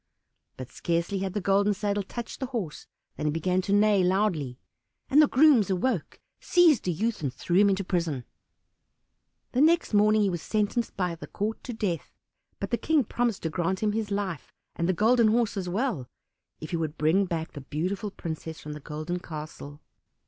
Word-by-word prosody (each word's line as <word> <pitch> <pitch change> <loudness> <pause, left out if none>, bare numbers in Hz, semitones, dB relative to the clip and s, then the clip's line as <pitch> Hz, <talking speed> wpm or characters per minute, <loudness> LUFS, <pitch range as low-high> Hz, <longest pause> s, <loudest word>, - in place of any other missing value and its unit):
But 130 -1 -8
scarcely 170 +3 -1
had 190 -1 -3
the 205 - 0
golden 200 +2 +2
saddle 205 0 -1
touched 235 +4 -7
the 265 - -2
horse 220 - -5 0.3
than 150 - -1
he - - +2
began 180 +4 0
to 190 - -4
neigh 205 -1 +4
loudly. 180 -9 0 0.5
The 300 +2 +7
grooms 265 - +5
awoke, 190 - -1 0.2
seized 340 - +4
the 180 - +1
youth, 215 +6 -1
and 140 -4 -1
threw 175 +6 -1
him 200 +1 +6
into 195 0 0
prison. 170 -8 -1 1.3
The 255 - +1
next 330 -4 +3
morning 210 +1 +5
he 200 - +2
was 175 -2 -3
sentenced 215 +4 -1
by 180 -3 0
the 165 - -9
court 215 +2 -3
to 245 - -4
death; 190 -8 -3 0.4
but - - -4
the 235 - +2
King 305 +2 +2
promised 235 -1 -1
to 160 - -1
grant 185 +4 -1
him 210 - +2
his 215 -1 -2
life, 200 -7 -3 0.2
and 170 +1 -1
the - - +3
Golden 225 +5 +4
Horse 225 0 +2
as 185 -3 -3
well, 195 - -1 0.5
if 155 - -8
he 170 - 0
could 160 -1 -3
bring 165 +6 +3
back 165 -2 -3
the 145 - -8
beautiful 180 +9 -3
princess 160 -3 -6
from 150 - -7
the 150 - -7
Golden 155 +4 -4
Castle. 150 -3 -8
195 Hz, 190 wpm, -27 LUFS, 165-215 Hz, 1.3 s, The